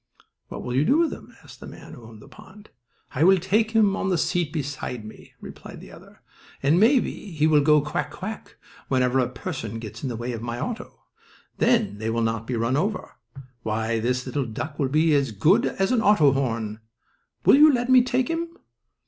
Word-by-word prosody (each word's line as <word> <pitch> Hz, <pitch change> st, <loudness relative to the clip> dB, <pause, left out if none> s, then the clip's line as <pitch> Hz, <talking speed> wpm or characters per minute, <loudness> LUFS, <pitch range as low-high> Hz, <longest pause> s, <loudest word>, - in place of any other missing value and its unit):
"What -, -, -8 dB
will 125 Hz, -, -4 dB
you 135 Hz, -, +3 dB
do 275 Hz, -, +3 dB
with 335 Hz, -1 st, +1 dB
him?" -, -, -13 dB
asked -, -, -15 dB
the -, -, -10 dB
man -, -, -12 dB
who -, -, -12 dB
owned 110 Hz, -2 st, -14 dB
the -, -, -15 dB
pond. 210 Hz, +2 st, -16 dB, 0.4 s
"I 145 Hz, +3 st, +1 dB
will 190 Hz, +2 st, +6 dB
take 210 Hz, +5 st, +1 dB
him 215 Hz, -3 st, +3 dB
on 190 Hz, -, -2 dB
the 180 Hz, -, +1 dB
seat 165 Hz, -1 st, -1 dB
beside 140 Hz, -6 st, -5 dB
me," 110 Hz, -, -13 dB
replied -, -, -11 dB
the -, -, -13 dB
other, -, -, -17 dB, 0.4 s
"and 150 Hz, +6 st, +3 dB
maybe 240 Hz, +5 st, +3 dB, 0.2 s
he 155 Hz, -1 st, +1 dB
will 155 Hz, -2 st, +4 dB
go 150 Hz, +1 st, +4 dB
'quack 150 Hz, +4 st, -3 dB
quack' 215 Hz, +3 st, -8 dB, 0.3 s
whenever 130 Hz, 0 st, +1 dB
a 125 Hz, -1 st, +1 dB
person 125 Hz, -, -6 dB
gets 110 Hz, -2 st, -9 dB
in 135 Hz, -, -3 dB
the 120 Hz, -, -4 dB
way 120 Hz, +2 st, -4 dB
of 115 Hz, -2 st, -6 dB
my 120 Hz, 0 st, -5 dB
auto. 230 Hz, -, -6 dB, 0.6 s
Then 230 Hz, -, +1 dB
they 110 Hz, +1 st, -3 dB
will 115 Hz, 0 st, -1 dB
not 115 Hz, 0 st, -2 dB
be 125 Hz, -, -2 dB
run 115 Hz, +4 st, 0 dB
over. 200 Hz, +6 st, -2 dB, 0.5 s
Why, 110 Hz, +1 st, -2 dB
this 125 Hz, +2 st, -1 dB
little 135 Hz, 0 st, -3 dB
duck 140 Hz, +7 st, -6 dB
will 135 Hz, -3 st, 0 dB
be 155 Hz, +3 st, +2 dB
as 140 Hz, -4 st, +1 dB
good 150 Hz, -, +3 dB
as 195 Hz, +3 st, -1 dB
an 245 Hz, -3 st, +2 dB
auto 200 Hz, -10 st, +4 dB
horn! 115 Hz, -5 st, -2 dB, 0.7 s
Will -, -, +7 dB
you 305 Hz, +1 st, +7 dB
let 245 Hz, -2 st, -1 dB
me 255 Hz, -1 st, +6 dB
take 250 Hz, 0 st, 0 dB
him?" 330 Hz, 0 st, -3 dB
145 Hz, 210 wpm, -24 LUFS, -, 0.7 s, Will